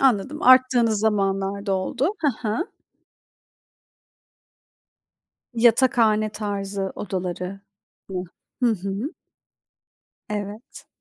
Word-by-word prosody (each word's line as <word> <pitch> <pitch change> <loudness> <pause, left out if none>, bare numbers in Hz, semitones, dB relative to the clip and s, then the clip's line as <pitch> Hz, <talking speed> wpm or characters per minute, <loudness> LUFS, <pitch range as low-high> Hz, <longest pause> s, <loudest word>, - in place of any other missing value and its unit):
anladım, 270 +3 +2
arttığınız 250 -4 +5
zamanlarda 200 -1 0
oldu. 245 - 0
Hı 255 -7 0
hı. 225 +11 0 2.9
Yatakhane 230 -2 +4
tarzı 200 -2 -3
odaları 185 0 -4 0.5
mı? 185 -1 -3 0.4
Hı - - +5
hı. 200 - -3 1.1
Evet. 210 +2 -6
210 Hz, 70 wpm, -23 LUFS, 195-240 Hz, 2.9 s, arttığınız